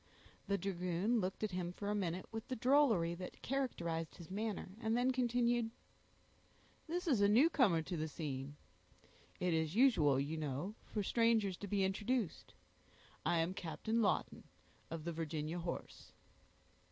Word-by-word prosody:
The 200 - +2
dragoon 190 +4 0
looked 190 +1 -2
at 215 - 0
him 180 -1 -2
for 200 +3 -6
a - - +1
minute 185 -3 -2
with 225 0 -5
the 260 - -2
drollery 235 -10 +4
that 180 +1 -7
characterized 170 -12 -2
his 175 0 -11
manner, 210 -1 -3
and 225 0 +1
then 250 +1 +3
continued,— 240 -2 +2 1.2
"This 350 +2 -2
is 255 -10 +3
a 200 - +5
newcomer 230 - +5
in 175 -3 -2
the 155 - -1
scene; 145 -2 -5 0.8
it 180 -1 +1
is 160 +1 0
usual, 165 - +5
you 145 +4 -2
know, 150 +6 -3
for 210 - -2
strangers 225 -3 +3
to 205 - -6
be 200 0 +1
introduced; 205 +1 -1 0.7
I 170 0 +3
am 170 +3 -1
Captain 190 +7 -1
Lawton, 200 -4 0 0.4
of 165 -1 -5
the 170 +1 -3
Virginia 160 +1 -3
horse." 170 0 -6
190 Hz, 155 wpm, -37 LUFS, 165-230 Hz, 1.2 s, a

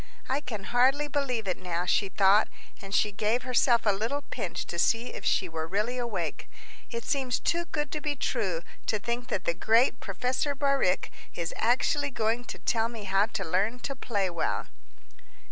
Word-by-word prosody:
"I 270 +3 0
can 220 -7 -5
hardly 260 +6 +3
believe 260 -7 -1
it 185 - -1
now," 175 -1 -2
she 195 +2 +2
thought, 200 +2 +5 0.3
and 195 - -9
she 210 +1 +3
gave 215 +4 0
herself 245 -2 +3
a 210 - +5
little 230 +9 -2
pinch - - -3
to - - -4
see 235 +2 +2
if - - -7
she 185 - +2
were 160 -1 -4
really 215 +7 -1
awake; 200 -10 -3 0.4
"it 235 -1 -4
seems 265 -4 0
too 340 0 0
good 295 -4 -3
to 305 - -3
be 295 -1 -1
true 195 -11 -1 0.2
to 215 - +2
think 235 +4 -3
that 185 - -2
the 170 - +2
great 230 +7 +3
Professor 250 +8 -1
Bauricke 275 -9 +1 0.2
is 170 -1 -3
actually 275 +5 +2
going 230 -1 0
to - - -6
tell 225 0 +1
me 230 -3 -7
how 195 +2 +2
to 220 -4 -3
learn 195 +8 +1
to 275 - -3
play 205 -6 -1
well!" 170 -2 -1
230 Hz, 185 wpm, -28 LUFS, 195-255 Hz, 0.4 s, thought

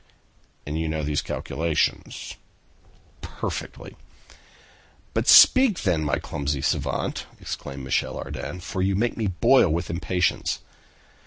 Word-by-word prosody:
"And 75 +2 -3
you 80 - -1
know 80 0 -2
these 75 -1 0
calculations?" 80 +3 -2 0.9
"Perfectly." - - -6 1.2
"But - - -1
speak, 255 -7 +7
then, 80 -2 +1
my 75 - 0
clumsy 70 -2 -3
savant," - - -2
exclaimed 70 0 -6
Michel 65 - -1
Ardan, 90 - -6
"for 95 +1 -4
you 95 +1 +1
make 115 +4 0
me 110 -3 -1
boil 95 +4 +4
with 85 +3 -2
impatience!" 90 +1 0
85 Hz, 115 wpm, -24 LUFS, 75-95 Hz, 1.2 s, speak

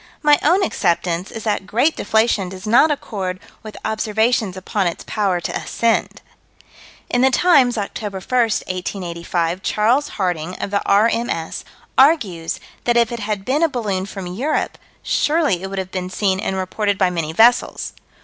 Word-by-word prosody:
My 295 -1 +5
own 360 +6 +3
acceptance 175 - 0
is 225 - -7
that 205 -3 -1
great 245 +10 +2
deflation 220 -3 +1
does 190 +2 -9
not 240 +8 +5
accord 195 -10 -3 0.2
with 215 -1 -10
observations 220 -2 0
upon 190 +1 -1
its 170 - -4
power 195 -4 0
to - - -4
ascend. 230 -1 -1 0.8
In 245 - +1
the 265 - +5
Times, 265 -6 +4
Oct. 205 +1 -4
1, 210 -1 -3
1885, 185 -5 -2
Charles 230 +9 +2
Harding, 180 -2 -2
of 200 - -5
the 200 - +1
R.M.S., 210 -5 +1 0.4
argues 220 - +3 0.3
that 240 0 +3
if 235 -1 +3
it 235 - -4
had 205 -2 -3
been 280 +4 +1
a 330 - +4
balloon 205 -8 -2
from 195 -1 -7
Europe, 230 +13 -2 0.2
surely 295 - +1
it 190 - -5
would 195 - -6
have 190 -1 -4
been 185 -1 -4
seen 190 0 0
and 190 - -2
reported 200 +2 -1
by 185 -2 +2
many 165 -3 -2
vessels. 230 +8 +3
205 Hz, 160 wpm, -20 LUFS, 185-240 Hz, 0.8 s, My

